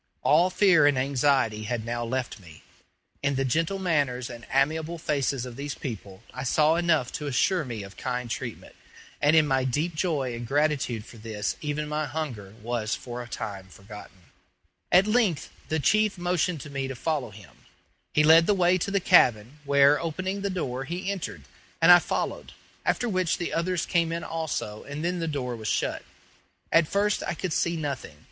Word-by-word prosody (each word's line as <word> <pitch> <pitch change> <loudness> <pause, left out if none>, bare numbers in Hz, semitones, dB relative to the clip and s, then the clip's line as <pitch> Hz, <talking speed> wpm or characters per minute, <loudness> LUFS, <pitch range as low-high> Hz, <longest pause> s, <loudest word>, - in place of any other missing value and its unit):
All 170 +5 +4
fear 185 -6 +5
and 145 -2 +3
anxiety 130 -5 +1
had 110 0 -3
now 120 0 -2
left 120 0 -3
me; 85 -5 -15 0.6
in 140 0 0
the 135 0 0
gentle 165 +8 0
manners 140 -9 0
and 120 -1 -10
amiable 155 +5 +1
faces 140 -5 -1
of 125 -1 -9
these 145 +1 -4
people 100 -5 -7
I 130 - -5
saw 150 +4 +3
enough 165 -7 +1
to 150 - -5
assure 155 +6 +1
me 115 -6 -6
of 100 0 -12
kind 125 -1 -3
treatment; 120 0 -6 0.5
and 150 +2 +4
in 155 -1 +6
my 135 -2 +1
deep 150 +7 -1
joy 155 -6 -1
and 120 0 -6
gratitude 140 -5 0
for 120 - -13
this 110 -2 -3
even 150 0 -2
my 150 0 -2
hunger 125 -9 -5
was 115 -1 -1
for 120 0 -7
a 120 - -8
time 100 -4 -6
forgotten. 100 +1 -12 0.7
At 185 +2 +6
length 215 -7 +1 0.2
the 160 - +1
chief 210 +7 +2
motioned 175 -2 0
to 150 - -9
me 135 -1 -3
to 135 - -5
follow 145 -3 -2
him. 105 -2 -15 0.6
He 150 - +3
led 160 +2 +7
the 205 - +4
way 180 0 +3
to 190 - -2
the 200 0 +1
cabin, 125 - +4
where, 140 +1 +5
opening 185 +4 -3
the 200 - -1
door, 135 -9 -3
he 180 +6 -3
entered, 130 - -5 0.4
and 165 +2 +7
I 175 - +10
followed, - - -3 0.3
after 245 - +1
which 185 -6 0
the 175 - -3
others 170 0 0
came 170 -2 +1
in 170 0 -3
also 155 -10 -4
and 145 +3 -5
then 180 0 -1
the 165 - -2
door 130 -5 -3
was 110 -2 -6
shut. - - -1 0.7
At 165 -2 +4
first 205 +3 +1
I - - -3
could 180 0 -3
see 170 +1 0
nothing. 140 - -5
145 Hz, 190 wpm, -26 LUFS, 120-170 Hz, 0.7 s, I